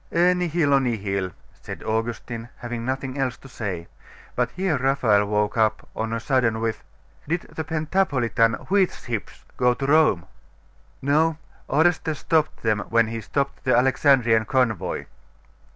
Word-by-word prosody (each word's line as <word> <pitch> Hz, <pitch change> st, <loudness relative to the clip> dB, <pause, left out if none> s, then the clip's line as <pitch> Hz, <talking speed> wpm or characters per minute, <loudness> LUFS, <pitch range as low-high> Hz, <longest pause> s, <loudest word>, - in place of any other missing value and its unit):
'E 175 Hz, +2 st, +4 dB
nihilo 165 Hz, -5 st, +2 dB
nihil!' 100 Hz, -7 st, -1 dB, 0.3 s
said -, -, -8 dB
Augustine, 115 Hz, +1 st, -3 dB
having 120 Hz, -1 st, -5 dB
nothing 130 Hz, +2 st, -3 dB
else 130 Hz, -2 st, -1 dB
to -, -, -14 dB
say. 95 Hz, -9 st, -5 dB, 0.5 s
But 125 Hz, -1 st, +1 dB
here 180 Hz, +3 st, -1 dB
Raphael 125 Hz, -6 st, +3 dB
woke 105 Hz, +1 st, 0 dB
up 110 Hz, 0 st, +1 dB
on 110 Hz, 0 st, -2 dB
a 115 Hz, -, -1 dB
sudden 115 Hz, -2 st, +1 dB
with 115 Hz, -1 st, -2 dB, 0.4 s
'Did 165 Hz, +3 st, 0 dB
the 160 Hz, -, -3 dB
Pentapolitan 145 Hz, -8 st, +1 dB, 0.2 s
wheat 195 Hz, -2 st, +4 dB
ships 115 Hz, -4 st, -6 dB
go 125 Hz, -1 st, +3 dB
to 135 Hz, -, -3 dB
Rome?' 140 Hz, -, +4 dB, 0.8 s
'No; 155 Hz, +3 st, +2 dB, 0.3 s
Orestes 160 Hz, +1 st, +2 dB
stopped 155 Hz, 0 st, 0 dB
them 110 Hz, -2 st, +2 dB
when 115 Hz, -1 st, +3 dB
he 115 Hz, 0 st, -4 dB
stopped 140 Hz, +5 st, -2 dB
the 130 Hz, -, +3 dB
Alexandrian 125 Hz, -3 st, +4 dB
convoy. 110 Hz, -8 st, 0 dB
125 Hz, 140 wpm, -24 LUFS, 110-145 Hz, 0.8 s, E